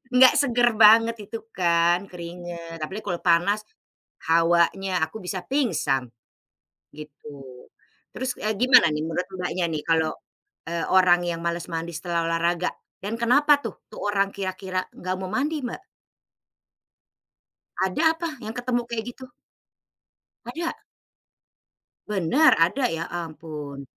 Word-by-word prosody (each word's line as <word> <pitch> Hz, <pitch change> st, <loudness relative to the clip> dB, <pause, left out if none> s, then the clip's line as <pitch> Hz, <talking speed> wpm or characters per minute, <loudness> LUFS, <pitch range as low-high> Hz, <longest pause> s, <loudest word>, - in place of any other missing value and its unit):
Nggak 255 Hz, 0 st, +8 dB
seger 245 Hz, -3 st, +3 dB
banget 225 Hz, +1 st, +7 dB
itu 225 Hz, +2 st, -5 dB
kan, 175 Hz, +1 st, +2 dB
keringat, 170 Hz, -1 st, -8 dB
apalagi 190 Hz, +8 st, -5 dB
kalau 175 Hz, -4 st, -2 dB
panas, 180 Hz, +4 st, +3 dB, 0.7 s
hawanya, 170 Hz, +2 st, +2 dB
aku 160 Hz, -, -10 dB
bisa 185 Hz, 0 st, -4 dB
pingsan, 160 Hz, -, 0 dB, 0.9 s
gitu. 150 Hz, 0 st, -12 dB, 0.8 s
Terus, 255 Hz, -1 st, -3 dB
eee, 215 Hz, +1 st, -1 dB
gimana 250 Hz, -8 st, +6 dB
nih 150 Hz, -, -2 dB
menurut 165 Hz, +3 st, -2 dB
Mbaknya 180 Hz, 0 st, -2 dB
nih, 150 Hz, -1 st, -3 dB
kalau, 160 Hz, -1 st, +2 dB, 0.6 s
eee, 170 Hz, 0 st, -2 dB
orang 185 Hz, -2 st, +5 dB
yang 170 Hz, -1 st, -3 dB
males 170 Hz, 0 st, -2 dB
mandi 165 Hz, +1 st, -3 dB
setelah 170 Hz, 0 st, -2 dB
olahraga? 170 Hz, +1 st, 0 dB, 0.3 s
Dan 205 Hz, +3 st, -3 dB
kenapa 285 Hz, +5 st, +4 dB
tuh, -, -, -6 dB
tuh -, -, -9 dB
orang 195 Hz, -1 st, +1 dB
kira-kira 185 Hz, -1 st, -3 dB
nggak 185 Hz, +1 st, -4 dB
mau 185 Hz, -1 st, -5 dB
mandi, 295 Hz, +6 st, -1 dB
Mbak? 245 Hz, +10 st, -6 dB, 1.9 s
Ada 320 Hz, -, +1 dB
apa 335 Hz, 0 st, -3 dB
yang 220 Hz, +2 st, -6 dB
ketemu 245 Hz, 0 st, 0 dB
kayak 230 Hz, -2 st, -3 dB
gitu? 260 Hz, -1 st, -12 dB, 1.2 s
Ada? 330 Hz, +8 st, -4 dB, 1.3 s
Bener? 210 Hz, -, +3 dB
Ada? 170 Hz, +12 st, +2 dB
Ya 165 Hz, -, -3 dB
ampun. 155 Hz, -4 st, -7 dB
185 Hz, 125 wpm, -24 LUFS, 170-230 Hz, 1.9 s, Nggak